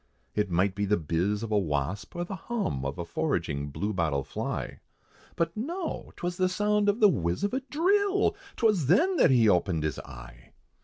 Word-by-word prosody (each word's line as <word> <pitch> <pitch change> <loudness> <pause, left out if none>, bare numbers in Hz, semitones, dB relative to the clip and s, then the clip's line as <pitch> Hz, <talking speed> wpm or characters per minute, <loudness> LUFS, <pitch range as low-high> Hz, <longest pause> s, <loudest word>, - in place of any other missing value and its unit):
It 105 -1 0
might 95 +3 +2
be 100 +1 -1
the 105 +1 +2
bizz 85 +7 -1
of 115 - -5
a 105 - +4
wasp, 80 - -2
or 175 - -2
the 195 - -6
hum, 185 - -3
Of 70 +1 -3
a 85 - -4
foraging 85 - -2
blue 100 +9 -3
bottle 80 -7 0
fly, - - -4 0.6
But 165 0 -1
no! 330 - -4
'twas 175 0 -4
the 185 0 +2
sound 210 +2 +2
of 205 +3 +1
the 210 - +7
whizz 85 - 0
of 205 - 0
a 265 - 0
drill! 400 +6 +2 0.2
'Twas 210 - +2
then 340 - +4
that - - +5
he 120 -4 +5
opened 90 -4 +2
his 75 -2 -2
eye. - - -12
105 Hz, 195 wpm, -28 LUFS, -, 0.6 s, the